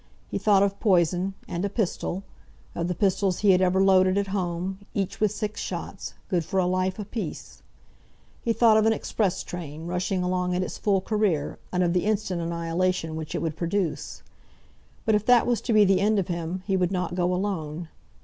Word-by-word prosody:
He -, -, -1 dB
thought 200 Hz, -2 st, +4 dB
of 200 Hz, 0 st, -1 dB
poison, 185 Hz, -1 st, +2 dB
and 175 Hz, +2 st, -3 dB
a 200 Hz, -, 0 dB
pistol, 195 Hz, -2 st, -2 dB, 0.5 s
of 170 Hz, -, -2 dB
the 180 Hz, -, -2 dB
pistols 190 Hz, 0 st, +1 dB
he 205 Hz, -2 st, +6 dB
had 185 Hz, 0 st, +4 dB
ever 185 Hz, 0 st, +3 dB
loaded 190 Hz, 0 st, +4 dB
at 200 Hz, -1 st, 0 dB
home, 185 Hz, 0 st, -2 dB, 0.2 s
each 195 Hz, -2 st, -2 dB
with 215 Hz, -2 st, +2 dB
six 215 Hz, 0 st, -4 dB
shots, -, -, -5 dB
good 175 Hz, -4 st, 0 dB
for 190 Hz, +4 st, -1 dB
a 185 Hz, -, +2 dB
life 185 Hz, +1 st, 0 dB
apiece. 215 Hz, +2 st, -6 dB, 0.8 s
He 230 Hz, -, 0 dB
thought 225 Hz, -1 st, +5 dB
of 220 Hz, 0 st, +4 dB
an 225 Hz, -, +4 dB
express 200 Hz, -4 st, -1 dB
train, 160 Hz, -2 st, -7 dB
rushing 180 Hz, +1 st, -1 dB
along 180 Hz, 0 st, 0 dB
at 180 Hz, -, 0 dB
its -, -, -6 dB
full 195 Hz, -2 st, +2 dB
career, 195 Hz, -8 st, 0 dB
and 180 Hz, 0 st, +1 dB
of 170 Hz, -1 st, +1 dB
the 180 Hz, +1 st, +1 dB
instant 200 Hz, -4 st, 0 dB
annihilation 170 Hz, 0 st, -1 dB
which 160 Hz, -1 st, -5 dB
it -, -, -2 dB
would 160 Hz, -2 st, -2 dB
produce. 175 Hz, 0 st, -2 dB, 0.8 s
But 220 Hz, -, +3 dB
if 210 Hz, -1 st, +2 dB
that 245 Hz, -1 st, +6 dB
was 240 Hz, -2 st, +1 dB
to -, -, -2 dB
be 215 Hz, -2 st, +6 dB
the 190 Hz, -1 st, +3 dB
end 210 Hz, +1 st, +3 dB
of 190 Hz, -3 st, -1 dB
him, 170 Hz, +2 st, -3 dB
he 195 Hz, -, +1 dB
would 180 Hz, -1 st, +1 dB
not 180 Hz, -2 st, -2 dB
go 180 Hz, 0 st, +1 dB
alone. 175 Hz, -4 st, -2 dB
185 Hz, 200 wpm, -26 LUFS, 175-200 Hz, 0.8 s, he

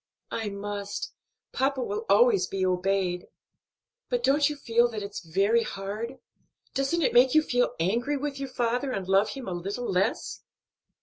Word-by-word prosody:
"I 220 Hz, -2 st, -2 dB
must; 200 Hz, 0 st, -5 dB, 0.4 s
papa 270 Hz, +1 st, +1 dB
will 435 Hz, -, -4 dB
always 485 Hz, -5 st, +5 dB
be 190 Hz, -1 st, -1 dB
obeyed." 185 Hz, -1 st, 0 dB, 0.8 s
"But -, -, 0 dB
don't 285 Hz, +2 st, +4 dB
you 295 Hz, -, -4 dB
feel 235 Hz, -3 st, +2 dB
that 215 Hz, -3 st, -5 dB
it's 200 Hz, 0 st, -5 dB
very 195 Hz, +7 st, +2 dB
hard? 205 Hz, +3 st, -5 dB, 0.6 s
doesn't 275 Hz, +5 st, 0 dB
it -, -, +2 dB
make 250 Hz, +3 st, +5 dB
you 310 Hz, -, +6 dB
feel 245 Hz, -4 st, +1 dB
angry 235 Hz, -, +1 dB
with 280 Hz, 0 st, -4 dB
your 275 Hz, -1 st, -4 dB
father 250 Hz, +2 st, -1 dB
and 190 Hz, -4 st, -3 dB
love 195 Hz, +2 st, +3 dB
him 270 Hz, -5 st, -7 dB
a -, -, -3 dB
little 195 Hz, +8 st, -4 dB
less?" 190 Hz, +5 st, -1 dB
230 Hz, 165 wpm, -27 LUFS, 195-275 Hz, 0.8 s, you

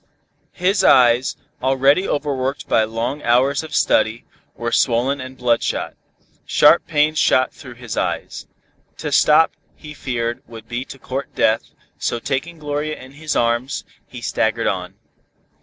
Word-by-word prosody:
His 190 Hz, +2 st, +1 dB
eyes, 125 Hz, -4 st, +4 dB, 0.2 s
already 135 Hz, +7 st, +3 dB
overworked 140 Hz, -2 st, -2 dB
by 110 Hz, -, +3 dB
long 115 Hz, +6 st, -3 dB
hours 130 Hz, +4 st, +2 dB
of 160 Hz, -, -7 dB
study, 110 Hz, +2 st, +2 dB, 0.3 s
were 120 Hz, 0 st, -3 dB
swollen 130 Hz, +4 st, +1 dB
and 130 Hz, 0 st, -9 dB
bloodshot. 120 Hz, -2 st, 0 dB, 0.5 s
Sharp 155 Hz, +3 st, +4 dB
pains 155 Hz, -1 st, +2 dB
shot 130 Hz, 0 st, +3 dB
through 125 Hz, -3 st, -12 dB
his 120 Hz, -2 st, -7 dB
head. -, -, -2 dB, 0.6 s
To -, -, -4 dB
stop 155 Hz, +2 st, +5 dB, 0.2 s
he 150 Hz, -1 st, -11 dB
feared 120 Hz, -4 st, -3 dB
would 115 Hz, -1 st, -11 dB
be 120 Hz, +2 st, -4 dB
to 135 Hz, -, -10 dB
court 135 Hz, +1 st, -6 dB
death, 110 Hz, +1 st, +1 dB, 0.3 s
so -, -, -1 dB
taking 140 Hz, +7 st, -3 dB
Gloria 150 Hz, 0 st, -3 dB
in 130 Hz, +1 st, -12 dB
his 155 Hz, +1 st, -4 dB
arms, 120 Hz, +3 st, 0 dB, 0.2 s
he -, -, -10 dB
staggered -, -, 0 dB
on. -, -, -2 dB
130 Hz, 140 wpm, -20 LUFS, 120-150 Hz, 0.6 s, stop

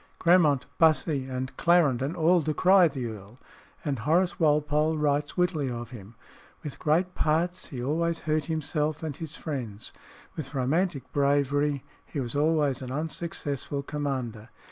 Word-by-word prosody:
Grammont, 165 Hz, -6 st, +4 dB
Bussy, 155 Hz, -4 st, +3 dB
and 130 Hz, 0 st, -5 dB
Clarendon 155 Hz, -4 st, +3 dB
all 170 Hz, +2 st, +4 dB
decry 180 Hz, +4 st, +4 dB
the 135 Hz, -5 st, -4 dB
earl; 110 Hz, 0 st, -8 dB, 0.5 s
and 140 Hz, -5 st, -1 dB
Horace 175 Hz, -, +1 dB
Walpole 150 Hz, 0 st, +2 dB
writes 145 Hz, +1 st, 0 dB
wittily 175 Hz, -6 st, +1 dB
of 120 Hz, -1 st, -6 dB
him 110 Hz, -2 st, -11 dB, 0.5 s
"With 150 Hz, -, -7 dB
great 175 Hz, +4 st, +1 dB
parts, 170 Hz, +4 st, 0 dB
he 125 Hz, -3 st, -6 dB
always 165 Hz, +4 st, 0 dB
hurt 155 Hz, -1 st, 0 dB
himself 155 Hz, 0 st, -2 dB
and 155 Hz, -3 st, -3 dB
his 160 Hz, 0 st, -7 dB
friends; 120 Hz, -9 st, -5 dB, 0.4 s
with 145 Hz, -2 st, -6 dB
romantic 140 Hz, +1 st, 0 dB
bravery, 145 Hz, 0 st, +1 dB, 0.2 s
he 150 Hz, -, -6 dB
was 120 Hz, -2 st, -3 dB
always 145 Hz, -3 st, +2 dB
an 130 Hz, -, -6 dB
unsuccessful 145 Hz, -1 st, -4 dB
commander. 130 Hz, -7 st, -4 dB
150 Hz, 140 wpm, -27 LUFS, 130-160 Hz, 0.5 s, Grammont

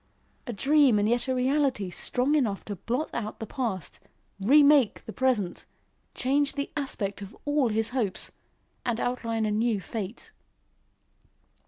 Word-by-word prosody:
a -, -, -2 dB
dream 275 Hz, +1 st, +4 dB
and 205 Hz, 0 st, +2 dB
yet 240 Hz, +3 st, +1 dB
a 260 Hz, -, +1 dB
reality 255 Hz, -6 st, +1 dB
strong 255 Hz, +9 st, 0 dB
enough 230 Hz, -10 st, +1 dB
to 205 Hz, -, -4 dB
blot 245 Hz, -, -2 dB
out 215 Hz, -2 st, -4 dB
the 220 Hz, -, -4 dB
past, 215 Hz, -, -3 dB, 0.4 s
remake 280 Hz, +2 st, +5 dB
the 220 Hz, -, -7 dB
present, 240 Hz, -9 st, 0 dB, 0.5 s
change 280 Hz, +3 st, +1 dB
the 280 Hz, 0 st, -3 dB
aspect 210 Hz, -9 st, -3 dB
of 200 Hz, +2 st, -9 dB
all 290 Hz, -4 st, +2 dB
his 220 Hz, +1 st, +1 dB
hopes, 235 Hz, -7 st, -2 dB, 0.5 s
and 240 Hz, -2 st, -1 dB
outline 230 Hz, -3 st, -1 dB
a 210 Hz, -, 0 dB
new 220 Hz, 0 st, +1 dB
fate. 210 Hz, +2 st, -6 dB
240 Hz, 145 wpm, -27 LUFS, 210-270 Hz, 0.5 s, remake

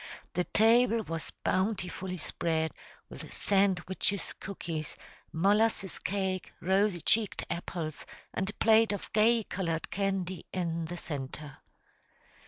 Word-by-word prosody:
The 180 Hz, 0 st, +1 dB
table 230 Hz, +1 st, +4 dB
was 165 Hz, -4 st, -5 dB
bountifully 190 Hz, -1 st, 0 dB
spread 160 Hz, 0 st, -1 dB, 0.4 s
with -, -, -9 dB
sandwiches, 195 Hz, 0 st, +1 dB
cookies, 165 Hz, -6 st, -4 dB, 0.3 s
molasses 200 Hz, +3 st, +2 dB
cake, 190 Hz, -1 st, -2 dB
rosy 190 Hz, 0 st, +2 dB
cheeked 215 Hz, +3 st, +1 dB
apples, 170 Hz, -2 st, -4 dB, 0.3 s
and 190 Hz, +1 st, -1 dB
a -, -, -5 dB
plate 225 Hz, -1 st, +5 dB
of 200 Hz, -, -6 dB
gay 225 Hz, +2 st, +4 dB
colored 165 Hz, -5 st, -3 dB
candy 190 Hz, -3 st, -1 dB
in 170 Hz, -3 st, -1 dB
the 175 Hz, +2 st, -5 dB
centre. 145 Hz, -2 st, -5 dB
190 Hz, 110 wpm, -30 LUFS, 170-205 Hz, 0.4 s, plate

